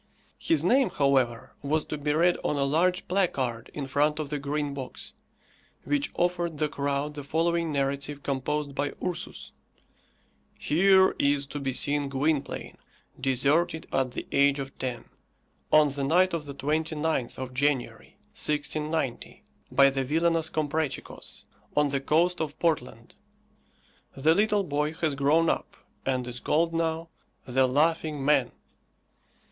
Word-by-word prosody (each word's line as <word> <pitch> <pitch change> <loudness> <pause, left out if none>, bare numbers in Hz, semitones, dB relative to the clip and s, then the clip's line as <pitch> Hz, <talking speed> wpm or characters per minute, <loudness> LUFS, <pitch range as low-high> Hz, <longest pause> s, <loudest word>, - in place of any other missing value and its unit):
His 325 - +2
name, 265 0 +4
however, 130 -5 +1
was 150 +2 0
to - - -4
be 150 0 -1
read 170 +3 +3
on - - 0
a 140 - +1
large 170 +6 +1
placard 135 - -1
in 145 - -5
front 145 +3 +1
of 155 -2 -4
the 150 - -1
Green 145 0 -2
Box, 135 -2 -7 0.7
which 290 0 0
offered 175 -2 0
the 155 +1 +1
crowd 140 0 -2
the 145 -1 -7
following 165 +2 0
narrative 140 0 -2
composed 140 +1 -2
by 145 +1 -2
Ursus: 180 -2 -5 1.1
"Here 190 +4 +4
is 140 0 +2
to 145 +1 -6
be 135 -1 -2
seen 145 +2 0
Gwynplaine, 140 +1 -2 0.4
deserted 140 +6 +1
at 130 -2 0
the - - -5
age 140 0 +4
of 135 -1 -6
ten, 125 -2 -4 0.7
on 155 -1 +6
the 140 0 -3
night 180 +6 +3
of 160 -3 -2
the 140 -1 -8
29th 155 -1 -1
of 130 -1 -6
January, 125 -4 -1 0.2
1690, 150 - -2 0.3
by 140 0 +6
the 135 0 -1
villainous 165 +3 +1
Comprachicos, 155 -1 -3 0.3
on 150 -1 +4
the 140 -1 -1
coast 170 +5 +2
of 155 -1 -4
Portland. 125 -8 -2 1.0
The 155 +4 +4
little 210 +2 +2
boy 150 -2 -1
has 160 -2 -1
grown 145 +4 +3
up, - - -2 0.3
and 130 -2 0
is 125 0 -5
called 165 +2 +1
now, 165 0 -1 0.4
THE 130 +1 +2
LAUGHING 150 +1 +1
MAN." 150 +1 +3
150 Hz, 140 wpm, -27 LUFS, 140-160 Hz, 1.1 s, on